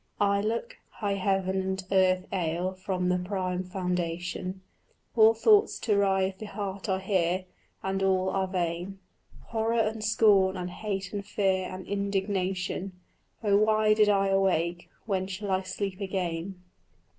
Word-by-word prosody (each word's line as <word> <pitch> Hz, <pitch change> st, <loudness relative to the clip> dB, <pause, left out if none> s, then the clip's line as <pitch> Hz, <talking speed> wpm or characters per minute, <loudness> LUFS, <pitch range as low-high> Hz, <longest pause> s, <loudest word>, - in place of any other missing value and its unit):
Ay, 200 Hz, 0 st, +3 dB
look: 230 Hz, -, -3 dB, 0.2 s
high 205 Hz, -2 st, -2 dB
heaven 190 Hz, -1 st, 0 dB
and 190 Hz, 0 st, -3 dB
earth 185 Hz, -1 st, +3 dB
ail 175 Hz, +1 st, -1 dB
from 185 Hz, -1 st, -2 dB
the 180 Hz, 0 st, +2 dB
prime 185 Hz, -1 st, -2 dB
foundation; 180 Hz, 0 st, -3 dB, 0.5 s
All 225 Hz, 0 st, +7 dB
thoughts 420 Hz, -, +4 dB
to 210 Hz, -, +2 dB
rive 190 Hz, -1 st, +1 dB
the 215 Hz, -, -6 dB
heart 200 Hz, 0 st, -5 dB
are 190 Hz, -, +2 dB
here, 185 Hz, -1 st, 0 dB, 0.4 s
and 195 Hz, 0 st, -1 dB
all 190 Hz, -1 st, +2 dB
are 190 Hz, -1 st, 0 dB
vain: 180 Hz, +1 st, -2 dB, 0.5 s
Horror 230 Hz, +1 st, 0 dB
and 220 Hz, 0 st, -2 dB
scorn 200 Hz, -3 st, +4 dB
and 180 Hz, 0 st, -4 dB
hate 195 Hz, 0 st, -4 dB
and 200 Hz, -1 st, -3 dB
fear 190 Hz, -2 st, 0 dB
and 185 Hz, 0 st, -7 dB
indignation 195 Hz, -2 st, -2 dB, 0.5 s
Oh 200 Hz, -2 st, +4 dB
why 215 Hz, 0 st, +4 dB
did 215 Hz, -1 st, +4 dB
I 195 Hz, -1 st, +3 dB
awake? 175 Hz, -3 st, +1 dB, 0.2 s
when 190 Hz, -3 st, -1 dB
shall 195 Hz, +1 st, -4 dB
I 190 Hz, 0 st, +2 dB
sleep 190 Hz, +1 st, -4 dB
again? 185 Hz, -1 st, -3 dB
190 Hz, 145 wpm, -28 LUFS, 185-200 Hz, 0.5 s, All